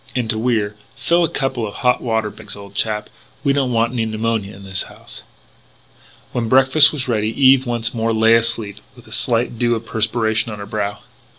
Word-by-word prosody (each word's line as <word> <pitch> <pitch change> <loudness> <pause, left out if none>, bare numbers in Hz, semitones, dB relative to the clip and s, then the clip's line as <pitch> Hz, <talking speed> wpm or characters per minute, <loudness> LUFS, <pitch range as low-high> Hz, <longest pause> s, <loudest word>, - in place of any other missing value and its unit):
And, 125 -3 -1
to 110 - -3
Wier, 110 -3 0 0.2
"Fill 170 +6 +2
a 165 - +1
couple 130 -5 -2
of 100 - -9
hot 125 -1 +1
water 110 -3 -1
bags, 110 -2 -8
old 100 -1 -12
chap. 105 0 -1 0.4
We 140 -2 +3
don't 135 -3 0
want 115 +1 +1
any 120 -2 0
pneumonia 110 -2 -2
in 100 - -13
this 95 0 -2
house." - - -10 1.1
When 115 -2 -2
breakfast 135 +4 +6
was 135 -5 -3
ready 110 -3 0
Eve 135 -1 +5
once 120 -1 -1
more 115 -1 0
lay 110 0 +4
asleep 115 -3 +1 0.2
with 120 -2 -16
a - - -17
slight 120 -2 -1
dew 120 -1 +2
of 115 0 -6
perspiration 110 0 0
on 105 - -6
her 100 - -7
brow. 100 0 -3
115 Hz, 200 wpm, -19 LUFS, 110-125 Hz, 1.1 s, breakfast